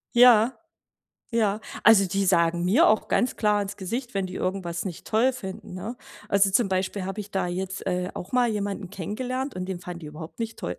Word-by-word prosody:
Ja, 240 0 +7 0.8
ja. 215 -3 +1 0.2
Also, 210 -3 +7
die 195 +2 0
sagen 170 -1 +3
mir 240 - +5
auch 215 - +2
ganz 250 - +1
klar 210 -1 +2
ins 200 0 -5
Gesicht, 240 +6 -4
wenn 195 -1 0
die 185 0 -7
irgendwas 180 -2 -3
nicht 180 -4 -6
toll 245 +5 +3
finden, 190 -7 -8
ne? 200 +7 -5 0.3
Also, 200 -1 +4
zum 220 +2 +3
Beispiel 185 +1 -1
habe 195 +3 -4
ich 205 0 -12
da 190 -2 0
jetzt, 190 +2 -4
äh, 180 0 -1
auch 180 - -7
mal 250 -1 +3
jemanden 200 -3 -3
kennengelernt 250 - -4
und 185 0 -3
den 185 -2 -4
fanden 180 -1 -7
die 160 - -10
überhaupt 155 +5 -10
nicht 225 -1 -4
toll. 90 - -4
195 Hz, 205 wpm, -26 LUFS, 185-225 Hz, 0.8 s, Ja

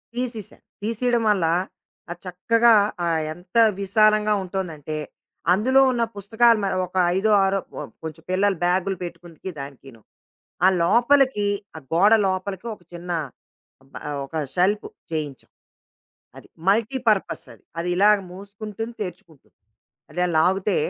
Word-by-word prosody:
తీసిశా. 240 -4 -5 0.3
తీసియడం 230 +2 0
వల్ల 195 -5 +2 0.7
అది 175 - -7
చక్కగా 230 +6 +3 0.3
ఆహ్, 165 -2 +1
ఎంత 180 +6 -7 0.2
విశాలంగా 215 +1 +3
ఉంటోందంటే 165 -5 -5 0.6
అందులో 260 +8 +4
ఉన్న 240 -2 0
పుస్తకాలు 225 +3 +3
మ - - +1 0.2
ఒక 180 +1 -7 0.2
ఐదో, 215 +3 +2
ఆరో 195 0 +1
కొ - - -7 0.2
కొంచెం 160 0 -7
పిల్లలు 195 0 +2
బ్యాగు‌లు 185 +2 +1
పెట్టుకుంటికి 175 0 -8
దానికీను. 135 -4 -10 0.6
ఆ - - +8 0.2
లోపలికి 245 +2 +3 0.3
ఆ - - -6
గోడ 200 +6 +5
లోపలికి 190 +3 -3
ఒక 180 - -26
చిన్న 175 +1 -6 0.8
బ - - -14
ఆహ్, 145 - -3
ఒక 135 - -11 0.2
షెల్ఫ్ 195 +4 +2 0.3
చేయించాం. 150 -4 -5 0.9
అది - - -15 0.2
మల్టీపర్పస్ 225 0 +1
అది. - - -23 0.2
అది 170 +1 -2
ఇలాగ 210 +2 +5
మూసుకుంటుంది 210 +4 -7
తెర్చుకుంటుంది. 170 -5 -10 0.6
అట్ల 180 0 0
లాగుతే 190 +4 +2
195 Hz, 125 wpm, -23 LUFS, 175-220 Hz, 0.9 s, ఆ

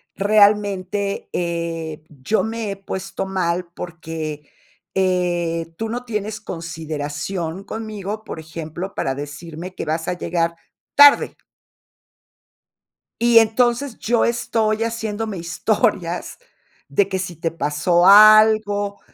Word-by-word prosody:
realmente, 200 -1 +2
eh, 170 -3 -3
yo 150 +9 -1
me 225 -2 -3
he - - -4
puesto 195 0 -5
mal 180 -2 -1
porque, 160 -3 -6 0.5
eh, 175 -3 0
tú 225 0 -3
no 245 +2 -4
tienes 215 -2 -3
consideración 165 +1 -5
conmigo, 215 -1 -5
por 190 - -7
ejemplo, 160 +4 -7
para 135 - -1
decirme 160 +5 -8
que - - -4
vas 160 +1 -2
a - - 0
llegar 170 -1 -1 0.4
tarde". 285 0 +7 1.9
Y 235 0 +6
entonces 240 +3 +1
yo 235 +1 +1
estoy 225 -2 0
haciéndome 225 -2 -3
historias 180 0 -1 0.5
de 200 -1 +2
que 190 - -2
si 180 -2 -5
te 165 +1 -2
pasó 165 +3 +1
algo, 210 0 +6
190 Hz, 110 wpm, -21 LUFS, 165-215 Hz, 1.9 s, tarde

